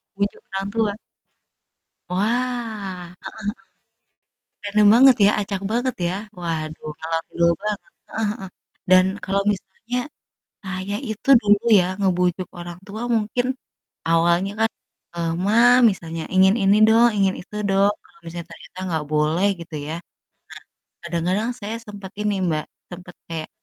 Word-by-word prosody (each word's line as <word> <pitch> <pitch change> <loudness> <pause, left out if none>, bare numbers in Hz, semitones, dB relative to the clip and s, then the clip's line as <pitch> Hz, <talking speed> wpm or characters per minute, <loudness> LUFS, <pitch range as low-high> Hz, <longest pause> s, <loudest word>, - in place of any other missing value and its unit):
Bujuk 200 +1 -2
orang 195 +1 -2
tua? 220 -2 +1 1.2
Wah, 210 -4 -2
heeh - - -28
heeh. - - -7 1.3
Random 210 0 +3
banget 265 +1 +8
ya, - - +7
acak 200 -1 -4
banget 245 +2 0
ya. 175 - -1 0.3
Waduh, 155 -2 -4
ngalor 165 0 -2
ngidul 170 0 +2
banget, 210 0 -2
heeh - - -29 0.8
heeh. - - -46
Dan 185 0 +7 0.2
kalau 195 +1 +1
misalnya, 205 +5 -5 0.7
saya 190 +1 -4
itu 220 +5 -5
dulu 205 +1 +3 0.2
ya - - +3 0.2
ngebujuk 180 -1 +1
orang 175 0 -8
tua 210 +2 -6
mungkin 225 +3 0 0.6
awalnya 170 +4 +3
kan, 225 0 +3 0.4
eee, 170 -1 -1
"Ma," 205 +2 +2 0.4
misalnya, 165 -4 -5
"ingin 190 +1 +6
ini 195 +1 +5
dong, 230 +2 +6
ingin 195 -2 +2
itu 210 +3 -11
dong." 195 +1 +4
Kalau - - -23
misalnya 170 0 -6
ternyata 175 +2 -13
nggak 160 -3 -1
boleh 155 +5 +2
gitu 170 -1 -10
ya, - - -3
nah - - -60 0.9
kadang-kadang 180 +6 -1
saya 215 +2 -4
sempet 205 -2 -9
ini, 210 -1 +1
Mbak, 155 -2 -1 0.3
sempet 175 0 -10
kayak 160 -2 -5
190 Hz, 140 wpm, -22 LUFS, 170-210 Hz, 1.3 s, banget